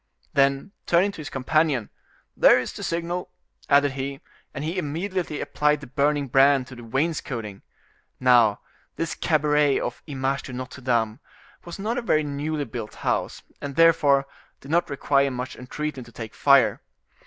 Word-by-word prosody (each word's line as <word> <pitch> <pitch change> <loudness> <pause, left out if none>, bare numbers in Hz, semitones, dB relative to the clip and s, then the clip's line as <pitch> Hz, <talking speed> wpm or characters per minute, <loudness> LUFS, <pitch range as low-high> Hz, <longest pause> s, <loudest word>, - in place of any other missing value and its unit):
Then, 140 +6 +2 0.2
turning 180 +4 +3
to 200 - -12
his 150 - -6
companion: 135 -2 0 0.4
"There - - +6
is - - -5
the - - -8
signal," 170 +1 -3 0.4
added 145 0 +5
he; 135 +1 -5 0.3
and 140 - -6
he 165 +4 -2
immediately 170 +1 -3
applied 150 +1 +1
the 145 - -10
burning 145 +2 0
brand 135 +1 +4
to 130 - -10
the 120 - -11
wainscoting. 115 -5 -3 0.6
Now, 120 -5 +4 0.3
this 165 - -2
cabaret 150 -2 +2
of 120 - -4
the 145 - -6
Image 135 +1 -1
de 130 - -9
Notre 130 +1 -7
Dame 115 -2 0 0.5
was 170 - -7
not 220 +5 -2
a - - -4
very 155 -9 +2
newly 145 +1 -3
built 115 -2 -7
house, - - -1 0.2
and 140 -1 -5
therefore, 145 -4 +4 0.3
did 140 - -10
not 170 0 +2
require 140 0 +2
much 125 0 -5
entreating 140 +2 -5
to 115 - -15
take 110 0 -8
fire. 140 -3 +4
140 Hz, 165 wpm, -24 LUFS, 130-155 Hz, 0.6 s, There